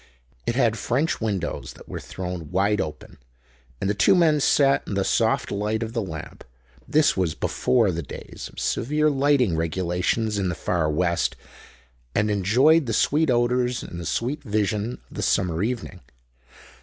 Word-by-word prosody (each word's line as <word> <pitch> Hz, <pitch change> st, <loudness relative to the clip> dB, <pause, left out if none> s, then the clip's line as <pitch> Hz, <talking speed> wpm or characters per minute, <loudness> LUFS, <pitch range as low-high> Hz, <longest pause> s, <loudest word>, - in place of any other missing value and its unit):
It 120 Hz, -, 0 dB
had 115 Hz, -4 st, +2 dB
French 140 Hz, +6 st, 0 dB
windows 100 Hz, -6 st, -3 dB
that -, -, -15 dB
were -, -, -6 dB
thrown 90 Hz, -4 st, -6 dB
wide 100 Hz, +2 st, +1 dB
open, 75 Hz, -, -7 dB, 0.6 s
and -, -, -1 dB
the 100 Hz, -, +2 dB
two 100 Hz, -, +4 dB
men 160 Hz, -4 st, +4 dB
sat 140 Hz, 0 st, +3 dB
in 100 Hz, -, -3 dB
the 95 Hz, -, +1 dB
soft -, -, +1 dB
light 105 Hz, +3 st, -1 dB
of 115 Hz, 0 st, -6 dB
the 115 Hz, -, -1 dB
lamp—this 65 Hz, -, -2 dB
was 90 Hz, -4 st, 0 dB
before 115 Hz, -6 st, +1 dB
the 85 Hz, 0 st, -3 dB
days 70 Hz, -, -9 dB
of -, -, -10 dB
severe 150 Hz, +4 st, +1 dB
lighting 135 Hz, -, +2 dB
regulations 90 Hz, +6 st, -1 dB
in 95 Hz, -2 st, 0 dB
the 90 Hz, -, -2 dB
Far 80 Hz, -1 st, 0 dB
West—and 75 Hz, -, -3 dB
enjoyed 125 Hz, -, +4 dB
the 115 Hz, -, -1 dB
sweet 150 Hz, +7 st, +2 dB
odors 125 Hz, 0 st, +1 dB
and 85 Hz, -, -8 dB
the 85 Hz, -, -6 dB
sweet 135 Hz, -, -2 dB
vision 105 Hz, 0 st, -1 dB, 0.2 s
of -, -, -11 dB
the -, -, -2 dB
summer 85 Hz, -2 st, +1 dB
evening. 110 Hz, -5 st, -3 dB
105 Hz, 160 wpm, -24 LUFS, 90-125 Hz, 0.6 s, two